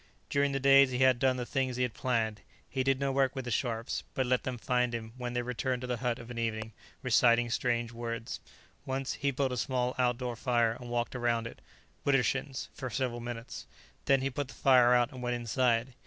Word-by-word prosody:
During 140 0 +2
the 135 - -1
days 135 0 +6
he 125 - -2
had 130 -1 +4
done 130 0 +2
the 125 - -3
things 130 -1 -1
he 125 - 0
had 125 -3 -1
planned; 115 -4 -1 0.3
he 130 - -2
did 135 0 +2
no 140 -1 0
work 135 0 +1
with 130 -2 -4
the 120 - -4
Scharpes, 115 0 -1
but 130 - +1
let 125 0 +2
them 130 -1 -4
find 125 0 0
him, 110 -1 -6
when 125 -1 -4
they 120 0 -1
returned 125 +1 -2
to - - -4
the 125 -1 -1
hut 120 0 -1
of 115 +1 -10
an 115 - -5
evening, 110 -1 -2 0.3
reciting 120 -1 +4
strange 120 -1 0
words. 115 0 -5 0.4
Once 135 0 -2
he 140 - -1
built 135 0 0
a 125 - -2
small 125 +1 0
outdoor 125 -1 0
fire 120 -1 +2
and 120 -1 -9
walked 120 +1 -2
around 120 -2 0
it, 115 - -9 0.4
widdershins, 135 0 0
for 130 -2 -5
several 125 0 -2
minutes. 120 0 -7 0.4
Then 135 -1 +4
he 135 +1 -1
put 145 +1 -3
the - - -12
fire 125 -2 +5
out 120 +2 +2
and 130 -2 -9
went 120 0 -1
inside. 120 +1 +1
125 Hz, 220 wpm, -31 LUFS, 120-130 Hz, 0.4 s, days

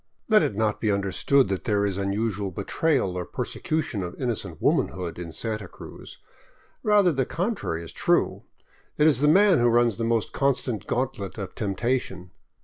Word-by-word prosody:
Let 215 -1 +5
it 105 - -1
not 110 0 0
be 110 - +1
understood 100 +7 +2
that 95 -1 -3
there 100 -2 +1
is 100 -1 -2
unusual 100 0 -1
betrayal 100 - 0
or 90 - -2
persecu 155 - -2
tion 105 - -4
of 90 -1 -6
innocent 105 - -2
womanhood 90 -2 0
in 85 -2 -6
Santa 110 +3 -3
Cruz. - - -12 0.6
Rather 205 -5 +4
the 135 -3 0
contrary 170 - -3
is 85 - -10
true. - - +1 0.6
It 150 - +4
is 155 -5 +4
the 150 - +3
man 190 +3 +5
who 120 - +3
runs 120 -1 +3
the - - -1
most 115 -1 0
constant 125 -6 -1
gauntlet 120 -7 -3
of 100 -3 -6
temptation. 100 -3 -2
110 Hz, 170 wpm, -25 LUFS, 95-135 Hz, 0.6 s, Let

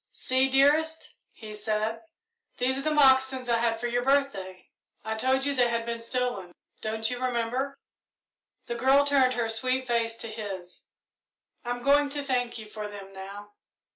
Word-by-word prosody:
"See, 260 +1 +1
dearest," 300 +4 +2 0.2
he 215 -2 -10
said, 215 +1 -2 0.6
"these 255 +1 +1
are 270 - -3
the 310 - 0
moccasins 265 -3 +4
I 235 -1 +2
had 230 -1 0
for 240 - -4
your 240 0 0
birthday. 245 -10 0 0.4
I 220 - -1
told 260 +4 +1
you 285 - +1
they 245 -3 +3
had 230 -1 -1
been 235 0 -4
stolen, 230 -7 -3 0.3
don't 220 0 -1
you 250 +1 -3
remember?" 255 +3 -1 0.9
The 235 - -4
girl 265 +4 +4
turned 270 -3 +3
her 235 -2 0
sweet 255 +3 0
face 230 -2 0
to 230 - -7
his. 200 -5 -7 0.8
"I'm 245 0 -4
going 285 +1 +4
to 285 0 -3
thank 250 -3 -1
you 220 - -7
for 210 0 -6
them 200 -1 -10
now." 200 +2 -9
245 Hz, 170 wpm, -27 LUFS, 220-265 Hz, 0.9 s, moccasins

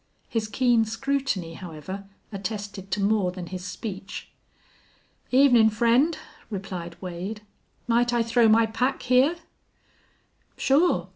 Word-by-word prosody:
His 225 -2 -2
keen 240 0 +3
scrutiny, 230 -6 -2
however, 180 +3 -8 0.3
attested 200 -1 -5
to 200 - -1
more 200 -3 +2
than 180 -1 -7
his 180 +1 -7
speech. 195 +1 -7 1.0
"Evenin', 250 -4 +6
friend," 235 +8 +3 0.3
replied 185 -4 -6
Wade. 185 +4 -5 0.5
"Might 240 +1 +3
I 240 -1 +2
throw 230 0 +3
my 225 +1 +5
pack 250 +4 -1
here?" 255 +6 +4 1.2
"Sure. 270 - +2
220 Hz, 115 wpm, -25 LUFS, 190-245 Hz, 1.2 s, Evenin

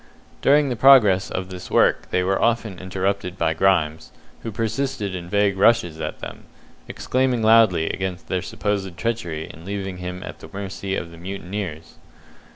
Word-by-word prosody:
During 145 0 +4
the 125 - -1
progress 110 -7 +6
of 90 0 -4
this 90 -1 -8
work - - +2
they 90 - +1
were 95 +1 0
often 115 -5 0
interrupted 95 0 -2
by 80 -2 +1
Grimes, 80 -3 +1 0.3
who 115 - -5
persisted 115 -1 -2
in 90 -1 -6
vague 100 0 +1
rushes 100 -8 +3
at - - -5
them, - - -8 0.4
exclaiming 130 -2 0
loudly 110 -7 +5
against 95 -1 -4
their 90 - -1
supposed 95 -2 -3
treachery 90 -7 -3
in 80 - -13
leaving 95 -1 -4
him 90 0 -6
at - - -8
the - - -11
mercy 100 -1 -4
of 85 -3 -5
the 85 - -13
mutineers. 90 -3 -6
95 Hz, 160 wpm, -22 LUFS, 90-110 Hz, 0.4 s, progress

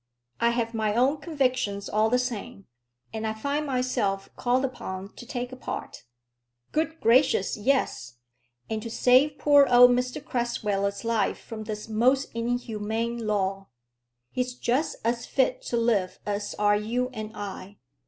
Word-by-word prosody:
"I 235 - +4
have 235 -1 -1
my 215 -2 0
own 260 +5 +3
convictions 255 - -1
all 215 +1 +2
the 250 - +3
same, 245 -4 -4 0.5
and 220 0 -2
I 220 - -2
find 285 +6 -2
myself 250 -7 -1
called 255 +2 +1
upon 195 -6 -6
to 240 - -11
take 245 0 -4
a - - -7
part." 255 - -6 0.7
"Good 320 +1 -1
gracious 240 -2 +3
yes! 210 - 0 0.5
and 220 -1 -3
to 230 - -6
save 255 +5 +4
poor 285 -1 +6
old 245 0 +8
Mr 250 +3 0
Crasweller's 220 -7 -2
life 225 -3 +1
from 220 -1 -8
this 210 0 -5
most 250 +5 +2
inhuman 230 -1 -2
law. 195 -2 -1 0.6
He's 250 0 -2
just 250 +5 0
as 235 +1 0
fit - - +1
to 240 - 0
live 220 -6 +1
as 205 0 -3
are 205 0 +4
you 235 +4 -1
and 215 -1 -7
I." 200 0 -7
235 Hz, 150 wpm, -26 LUFS, 210-255 Hz, 0.7 s, old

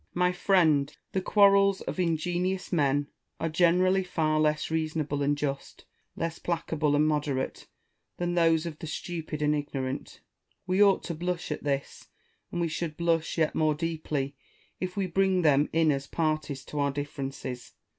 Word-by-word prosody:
My 180 0 +3
friend! 160 -6 +2
the 190 - 0
quarrels 200 0 +4
of - - -5
ingenious 180 +3 -1
men 145 -3 +2 0.3
are 165 - -1
generally 180 +3 +3
far 155 -4 0
less 155 0 +1
reason 160 0 0
able 145 -1 -2
and 145 +1 +1
just, 140 -1 -4 0.3
less 165 0 -3
placable 160 -3 0
and 150 +1 +3
moderate, 145 -3 -2 0.5
than 175 0 -1
those 165 -1 +3
of 155 -3 -6
the 160 - -6
stupid 160 -1 -4
and 150 0 +3
ignorant. 140 -2 -4 0.4
We 185 +2 +1
ought 200 -2 +5
to 170 - -4
blush 175 0 -3
at 150 - -4
this: 140 -1 -3 0.4
and 175 - -3
we 170 - +1
should 160 -1 -4
blush 165 -1 0
yet 160 -2 +2
more 155 -1 +2
deeply 150 -4 -3 0.4
if 185 +1 -4
we 195 - +1
bring 185 0 +2
them 145 -1 +4
in 160 -1 +3
as 140 -1 -2
parties 155 -4 -2
to 150 - -5
our 140 0 +2
differences. 135 -3 -5
160 Hz, 165 wpm, -28 LUFS, 145-175 Hz, 0.5 s, ought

